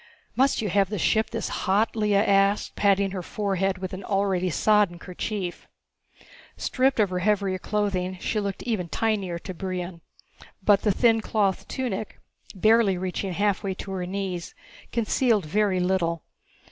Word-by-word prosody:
"Must 265 -3 +2
you 210 - -1
have 195 0 +2
the 210 - -3
ship 220 +5 +2
this 230 -1 -3
hot?" 210 +4 +1
Lea 210 -2 +1
asked, 200 0 +2
patting 200 -1 +2
her 185 -1 -4
forehead 195 0 -1
with 185 0 -6
an 190 +1 -6
already 195 -2 0
sodden 205 +1 +3
kerchief. 180 +1 -5 0.9
Stripped 260 -1 +1
of 205 -3 +3
her 180 - -1
heavier 195 -1 +1
clothing, 190 -2 -1
she 215 - -1
looked 200 -2 -4
even 205 -8 -2
tinier 200 -4 -1
to 185 +2 -7
Brion. 180 -1 -5 0.6
But 200 0 +5
the 210 - +2
thin 225 +2 +3
cloth 205 -3 0
tunic 235 -5 -4 0.4
reaching - - -12
barely 195 -4 +2
halfway 200 -1 0
to 195 - -7
her 185 -2 -3
knees 185 -2 -4 0.4
concealed 230 -3 +1
very 195 +3 +1
little. 175 -3 0
195 Hz, 150 wpm, -25 LUFS, 185-210 Hz, 0.9 s, But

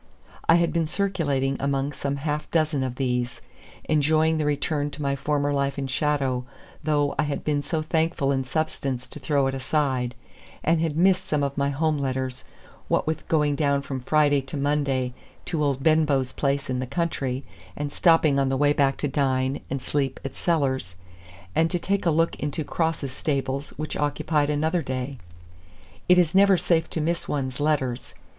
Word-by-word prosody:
I 165 - +8
had 170 0 +2
been 165 -2 +1
circulating 145 -8 0
among 140 0 0
some 140 0 -2
half 150 +1 -3
dozen 155 -4 +1
of 130 -2 -2
these, 125 -2 -1 0.4
enjoying 155 +1 +2
the 150 - 0
return 145 0 0
to 145 +1 -8
my 140 0 +1
former 145 0 0
life 140 0 0
in 140 - -2
shadow, 135 -2 0 0.4
though 145 -1 +1
I - - +4
had 140 - -3
been 145 -1 0
so 155 +2 -2
thankful 160 -3 +1
in 135 -1 +1
substance 130 -2 -2
to - - -9
throw 140 0 +1
it 135 - 0
aside, 130 -2 0 0.5
and 165 +1 +2
had 160 -2 -1
missed 185 +1 +4
some 150 -2 0
of 140 0 -1
my 140 0 +1
home 150 +1 0
letters, 130 -1 -2 0.4
what - - +1
with 160 0 -3
going 150 -2 +2
down 140 -1 +1
from 135 -1 -4
Friday 145 +2 +3
to 135 +3 -6
Monday 140 -3 0 0.3
to 160 -3 -1
old 135 -2 0
Benbow's 150 -5 +3
place 140 0 -1
in 125 -1 -1
the 130 - -3
country, 140 -3 -2 0.3
and 145 -1 -3
stopping 160 -5 +4
on 135 -1 +2
the 135 - 0
way 145 +1 +4
back 140 -2 +2
to 145 - -1
dine 135 -1 0
and 135 -1 -3
sleep 135 -1 -1
at 135 - -5
Sellar's 130 - 0 0.6
and 165 +7 +3
to 180 - 0
take 195 +1 -1
a - - +5
look 165 +1 +2
into 150 +2 -2
Cross's 160 -3 -1
stables, 140 0 -2
which 155 0 -4
occupied 145 0 0
another 155 +4 +1
day. 130 -1 -4 0.9
It 180 - +7
is 175 -2 +3
never 195 0 +6
safe 165 -1 +1
to 160 - -2
miss 170 +2 -1
one's 130 -2 -2
letters. 140 -5 -1
145 Hz, 180 wpm, -25 LUFS, 135-155 Hz, 0.9 s, I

